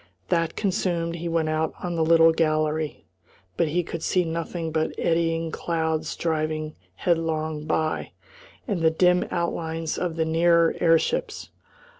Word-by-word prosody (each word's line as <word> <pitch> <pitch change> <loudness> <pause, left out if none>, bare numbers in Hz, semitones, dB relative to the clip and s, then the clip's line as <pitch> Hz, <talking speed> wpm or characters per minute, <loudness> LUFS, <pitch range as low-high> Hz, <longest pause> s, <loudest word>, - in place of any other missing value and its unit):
That 165 -1 +1
consumed, 175 -4 -1
he 170 +1 -4
went 165 -1 0
out 155 0 -1
on 175 -1 -2
the 165 - +1
little 165 0 +6
gallery; 155 -1 0 0.5
but 165 - +1
he 175 +4 0
could 165 0 -6
see 180 +1 +1
nothing 165 0 -3
but 160 0 -1
eddying 165 -1 0
clouds 160 -2 -2
driving 155 -1 -2 0.2
headlong 160 -3 -1
by, 155 0 -1 0.5
and 200 -7 -1
the 160 - +5
dim 180 +2 +3
outlines 165 -2 -2
of 175 -3 -2
the 160 -1 0
nearer 165 +1 +3
airships. 425 - +1
165 Hz, 140 wpm, -25 LUFS, 160-170 Hz, 0.5 s, little